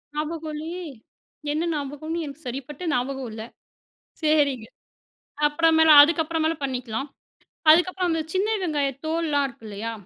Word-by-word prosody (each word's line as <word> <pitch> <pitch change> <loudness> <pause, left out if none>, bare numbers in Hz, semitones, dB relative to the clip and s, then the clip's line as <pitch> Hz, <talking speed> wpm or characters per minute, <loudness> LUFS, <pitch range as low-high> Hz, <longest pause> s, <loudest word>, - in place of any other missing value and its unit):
ஞாபகம் 310 +1 -4
இல்லையே. 335 +4 -6 0.7
என்ன 310 +2 -1
ஞாபகம்ன்னு 305 +3 -4
எனக்கு 285 +1 -10
சரிப்பட்ட 270 +5 -6
ஞாபகம் 255 0 -2
இல்லை. 220 0 -7 0.8
சரிங்க. 290 -6 +2 0.8
அப்புற 330 +3 +1
மேல, 320 0 +5
அதுக்கப்புற 320 +1 +2
மேல 320 +1 +2
பண்ணிக்கலாம். 255 -1 -3 0.6
அதுக்கப்புறம், 360 +3 +4
அந்த 325 -1 0
சின்ன 385 +3 +1
வெங்காய 295 -5 0 0.2
தோல்ளாம் 315 -3 0
இருக்குல்லையா? 225 -2 -7
300 Hz, 120 wpm, -24 LUFS, 270-325 Hz, 0.8 s, மேல